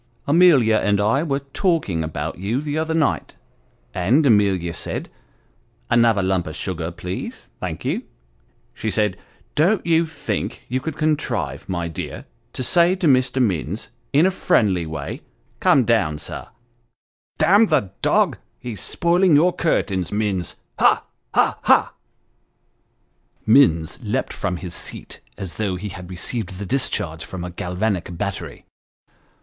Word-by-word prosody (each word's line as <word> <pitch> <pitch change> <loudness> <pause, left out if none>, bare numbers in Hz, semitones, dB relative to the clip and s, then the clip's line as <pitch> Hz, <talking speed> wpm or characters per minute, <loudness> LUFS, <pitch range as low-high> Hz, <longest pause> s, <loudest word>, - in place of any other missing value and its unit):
Amelia 140 -8 +5
and 105 -1 +2
I 110 +7 +2
were 140 -3 -1
talking 160 - +1
about 80 +1 -4
you 105 +7 -1
the 150 0 -3
other 160 +1 -1
night, 160 -3 0 0.6
and 120 - +3
Amelia 100 -7 +3
said - - -5 0.8
another 115 -4 +4
lump 95 -2 0
of 80 - -6
sugar, 85 -1 -3
please; 90 +2 -6
thank - - -5
ye - - -1 0.7
she 110 - -3
said, 105 -3 +1 0.4
don't 180 +7 +2
you 165 0 +3
think 160 -2 -4
you 130 +2 -1
could 160 +4 -5
contrive, 155 -1 -1
my 85 -2 -2
dear, 80 - -6 0.3
to 130 - -3
say 175 +6 +4
to 185 - -2
Mr. 130 -2 +3
Minns, 100 -3 -1 0.2
in 150 +5 +5
a 190 - +3
friendly 95 - +2
way 75 -3 -5 0.4
come 130 - +4
down, 100 -10 +2
sir - - -6 0.9
damn 200 +8 +5
the 135 - +1
dog! - - +2 0.2
he's 110 -7 -6
spoiling 175 -1 +3
your 175 +5 +4
curtains, 95 - 0
Minns 100 -4 -1 0.2
ha! - - +4 0.3
ha! - - +3
ha! - - +4 0.8
" - - -43
Minns 110 - +4
leaped 115 +3 -2
from 90 -3 -2
his 90 -1 -7
seat - - -6 0.2
as 95 -3 -6
though 100 -4 -1
he 100 +3 -5
had 90 -2 -9
received 95 +1 -4
the 100 - -5
discharge 90 -10 -2
from 90 -2 -7
a 90 - -5
galvanic 90 0 -2
battery. 100 0 -5
105 Hz, 145 wpm, -22 LUFS, 90-145 Hz, 0.9 s, Amelia